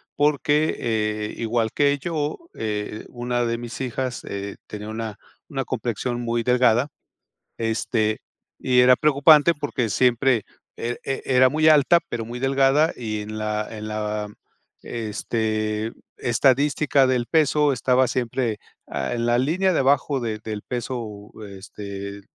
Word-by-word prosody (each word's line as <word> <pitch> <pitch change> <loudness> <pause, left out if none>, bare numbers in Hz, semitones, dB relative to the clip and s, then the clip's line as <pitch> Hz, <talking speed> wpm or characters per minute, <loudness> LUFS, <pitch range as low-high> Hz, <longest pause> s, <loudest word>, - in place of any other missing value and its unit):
porque, 150 +1 +2
eh, 105 -2 -1
igual 115 -1 0
que 145 0 +2
yo, 150 -1 -2 0.2
eh, 105 0 -4
una 120 0 -2
de 115 0 -1
mis 120 +2 -7
hijas, 130 0 -3
eh, 100 0 -5
tenía 105 0 -7
una 110 -1 -5 0.3
una 135 -3 -3
complexión 120 0 -3
muy 120 0 -1
delgada, 125 +1 +3 0.7
este, 110 -1 0 0.4
y 125 -1 +3
era 125 0 +7
preocupante 150 +3 +5
porque 140 -5 -2
siempre, 120 +2 +2 0.3
eh, 120 +1 -3
e 135 - -3
era 130 -1 +5
muy 155 +2 +2
alta 155 +2 +6
pero 115 -1 -3
muy 120 +2 -6
delgada 135 +4 +3
y 110 -3 -4
en 110 +1 -6
la 105 0 -2
en 110 0 -6
la 105 0 -3 0.6
este, 110 -1 -2 0.2
estadística 135 +3 +3
del 125 -2 +1
peso 150 -1 +3
estaba 125 +2 +2
siempre, 120 -2 -1 0.3
ah, 65 - -3
en 120 -1 -1
la 120 0 +3
línea 180 +8 +2
de - - +1
abajo 140 +1 +2
de 110 -3 -3
del 105 -2 -5
peso, 115 -4 -5 0.3
este, 100 0 -8
120 Hz, 140 wpm, -23 LUFS, 110-135 Hz, 0.7 s, era